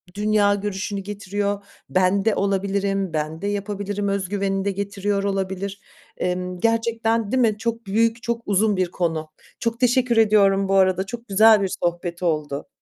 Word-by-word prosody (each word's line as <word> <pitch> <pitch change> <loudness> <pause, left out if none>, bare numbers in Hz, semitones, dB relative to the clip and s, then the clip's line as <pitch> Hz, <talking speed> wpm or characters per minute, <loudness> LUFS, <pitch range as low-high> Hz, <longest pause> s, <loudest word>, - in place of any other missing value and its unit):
dünya 205 -1 +3
görüşünü 200 0 -3
getiriyor. 205 0 -3 0.3
Ben 185 +2 +2
de 220 - +3
olabilirim, 195 -1 0
ben 155 +2 -3
de 200 - -2
yapabilirim 205 0 -3
özgüveni 195 0 -1
de 200 - +1
getiriyor 200 0 -2
olabilir. 195 0 -3 0.4
Emm, 180 0 -2
gerçekten 230 -1 0
değil 260 -1 +2
mi? 215 -3 +2
Çok 230 0 -3
büyük, 225 +3 +1
çok 235 0 -2
uzun 205 0 +2
bir 180 -1 0
konu. 160 -3 -2 0.3
Çok 230 0 -2
teşekkür 245 -1 +2
ediyorum 200 -3 +4
bu 195 - +2
arada. 190 0 +3
Çok 235 +3 -8
güzel 215 +1 +6
bir 190 - -1
sohbet 175 0 -2
oldu. 150 - -1
200 Hz, 155 wpm, -22 LUFS, 190-215 Hz, 0.4 s, güzel